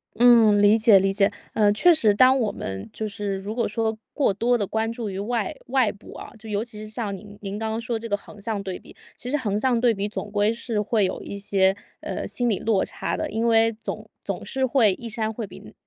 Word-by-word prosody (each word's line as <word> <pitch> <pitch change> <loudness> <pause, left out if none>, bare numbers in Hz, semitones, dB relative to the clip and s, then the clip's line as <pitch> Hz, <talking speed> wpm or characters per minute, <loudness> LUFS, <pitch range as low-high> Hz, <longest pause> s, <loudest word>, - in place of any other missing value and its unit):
嗯， 230 -3 +6
理 205 +2 +6
解 220 -3 +6
理 195 +1 +1
解。 200 +1 +3 0.2
呃， 210 -2 +4
确 345 +12 +5
实 225 -10 +3
当 255 +5 +5
我 220 -4 0
们 95 - -6
就 220 - -4
是 205 -1 -3
如 200 +3 -5
果 235 0 0
说 220 +1 -1 0.2
过 275 -9 +2
多 240 +5 +2
地 205 - -1
关 220 +3 -1
注 230 -1 -5
于 190 0 -5
外 220 0 -2
外 255 -4 +2
部 205 - -14
啊， - - -9
就 220 0 -10
尤 205 +1 -1
其 225 -3 -9
是 215 - -7
像 215 -2 -4
您 205 +1 -12
您 200 0 -5
刚 220 0 -2
刚 220 +1 -2
说 235 -1 -2
这 230 - -7
个 205 - +1
横 205 +1 -14
向 210 -1 -2
对 190 -2 -5
比， - - -16 0.2
其 245 - -6
实 295 - +1
横 210 -6 -1
向 250 0 +2
对 240 -1 +3
比 200 0 -3
总 205 0 -6
归 205 +1 +2
是 230 -2 -2
会 210 -1 +1
有 - - -3
一 200 - -7
些， 195 -1 +2 0.3
呃， - - -4
心 245 -1 -1
理 205 - +1
落 215 -4 +1
差 - - -3
的。 - - -3
因 225 +2 -1
为 225 0 +4
总 220 - -7
总 - - -4
是 265 0 -1
会 240 -6 +4
一 235 +5 -8
山 220 -1 -2
会 225 0 -5
比 175 - -13
215 Hz, 270 characters per minute, -24 LUFS, 205-230 Hz, 0.3 s, 嗯